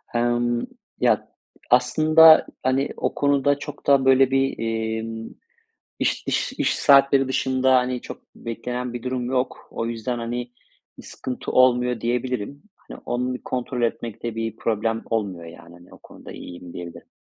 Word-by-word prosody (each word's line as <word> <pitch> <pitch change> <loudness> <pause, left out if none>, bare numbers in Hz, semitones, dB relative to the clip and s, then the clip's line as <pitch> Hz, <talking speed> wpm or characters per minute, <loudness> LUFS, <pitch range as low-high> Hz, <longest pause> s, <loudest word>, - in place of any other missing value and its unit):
Emm, 120 0 +1 0.3
ya, - - +2 0.4
aslında, 155 +6 +6 0.2
hani, 130 +2 +1
o - - -2
konuda 145 0 +2
çok 145 0 -9
da, 135 -1 +4
böyle 135 0 +5
bir, 135 0 +1
emm, 115 0 -3 0.7
iş - - 0
iş - - -1
iş - - 0
saatleri 140 -1 +5
dışında, 130 0 +2
hani, 125 -1 +1
çok - - -9
beklenen 125 +1 -5
bir 120 - -6
durum 125 -1 -2
yok. 125 +1 -2
O 115 - -3
yüzden, 115 +1 -3
hani, 120 +1 -4 0.5
bir - - -12
sıkıntı 130 -1 -6
olmuyor 125 -2 +3
diyebilirim. 125 +2 -3
Hani, - - -13
onu 125 +1 -1
bir 125 - -7
kontrol 125 -1 -3
etmekte 115 -1 -3
bir 115 -1 -3
problem 115 0 -1
olmuyor 100 -7 -3
yani. 85 +1 -13
Hani, 85 0 -17
o - - -14
konuda - - -14
iyiyim 90 0 -10
diyebilirim. 85 -1 -9
125 Hz, 150 wpm, -23 LUFS, 115-130 Hz, 0.7 s, aslında